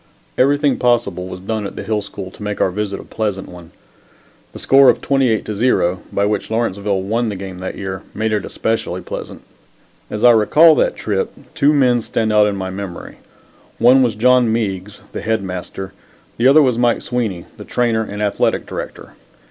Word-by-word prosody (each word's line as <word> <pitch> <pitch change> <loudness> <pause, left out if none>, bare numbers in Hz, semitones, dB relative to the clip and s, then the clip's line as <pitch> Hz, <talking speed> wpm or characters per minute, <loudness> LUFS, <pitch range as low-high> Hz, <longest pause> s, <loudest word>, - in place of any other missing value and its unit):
Everything 145 +1 +2
possible 115 -7 0
was 90 - -7
done 105 +1 -3
at - - -10
the - - -6
Hill 105 +1 -1
School 100 -2 -8
to - - -16
make 105 0 -4
our 95 - +2
visit 100 0 -3
a - - -9
pleasant 105 -3 -3
one. 85 -2 -12 0.8
The - - -10
score 135 0 +5
of - - +3
28 130 -7 +1
to 110 - -4
0, 100 -5 +1
by 100 - +1
which 105 0 -2
Lawrenceville 100 -4 -1
won 115 +4 -1
the 105 - -4
game 95 -1 -7
that 95 - -5
year, 95 -1 -5
made 110 +1 -1
it 105 - 0
especially 115 0 -2
pleasant. - - -8 0.7
As 105 +2 -4
I 120 - +8
recall 150 +9 +6
that - - +1
trip, 475 - -2 0.2
two 150 -2 +3
men 125 -5 +3
stand 110 0 -1
out 105 -1 +5
in 100 - -1
my 95 -1 -4
memory. 95 -2 -7 0.6
One 125 +3 +5
was 120 -4 +1
John 125 +1 +4
Meigs, 105 -3 -3
the - - -5
Head 110 -2 -1
Master. 95 +1 -6 0.4
The 120 - +3
other 150 +3 +7
was 125 -3 +1
Mike 120 -1 +2
Sweeney, 110 -8 -3
the - - -9
Trainer 115 -2 0
and 105 -1 -5
Athletic 105 - 0
Director. - - -7
110 Hz, 190 wpm, -18 LUFS, 100-120 Hz, 0.8 s, I